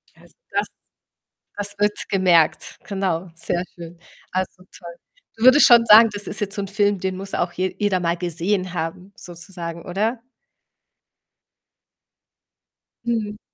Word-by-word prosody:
Ja, - - -22
also, - - -21 0.2
das - - 0 0.9
das 205 0 -5
wird 210 0 -1
gemerkt, 180 -5 +2
genau, 190 -3 -2
sehr 175 +1 -2
schön. 170 0 -10 0.3
Also, 185 0 -3
toll. 170 -1 -11 0.4
Du 220 - -5
würdest 270 +2 +8
schon 235 -1 +7
sagen, 225 +1 +8
das 205 0 -6
ist 210 - -4
jetzt 200 0 -3
so 200 - -2
'n 195 - -5
Film, 205 -1 +1
den 190 0 -3
muss 195 0 -7
auch 175 0 -1
je 185 0 -2
jeder 205 -3 +1
mal 170 0 0
gesehen 180 +2 -1
haben 180 +4 -5
sozusagen, 170 -1 -8
oder? 215 +6 -2 2.8
Mhm. 215 -3 -2
190 Hz, 140 wpm, -22 LUFS, 175-205 Hz, 2.8 s, würdest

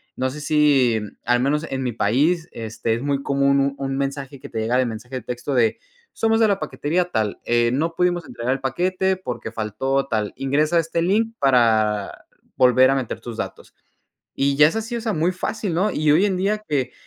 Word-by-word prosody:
no 130 0 -1
sé, 150 +3 -8
si 145 -7 +3 0.3
al 120 +1 +3
menos 150 +5 0
en 135 0 -3
mi 125 - -1
país, 150 - +1
este, 115 0 -3
es 115 - -2
muy 140 0 -1
común 140 0 +2
un 140 0 0
un 135 -1 -3
mensaje 140 0 -4
que - - -10
te - - -4
llega 115 +3 +1
de 130 - +3
mensaje 120 +3 -6
de 130 - -3
texto 125 +5 -4
de: 115 -4 +2 0.4
"Somos 225 0 +1
de 225 - +5
la 200 -2 +1
paquetería 175 +2 -1
tal, 110 -2 -1
eh, 120 0 +2
no 160 +6 0
pudimos 175 -2 +1
entregar 120 +2 -2
el 135 - -3
paquete 185 +7 0
porque 125 -10 -6
faltó 120 +5 -1
tal. 110 -4 -2
Ingresa 150 +5 +1
este 165 0 -1
link 220 +5 +1
para 110 -6 +2 0.3
volver 130 0 +5
a 135 - +2
meter 130 -4 -3
tus 120 -2 -7
datos". - - -7 0.6
Y 140 0 +1
ya 150 +1 +7
es 165 - -5
así, 225 +2 -3
o - - -3
sea, 225 -2 -2
muy 165 +3 +1
fácil, 190 +1 -3
¿no?, 195 +5 +1
y 155 0 +1
hoy 175 +7 +4
en 190 -3 +1
día 210 +3 0
que 140 -4 -1
140 Hz, 210 wpm, -22 LUFS, 125-170 Hz, 0.6 s, ya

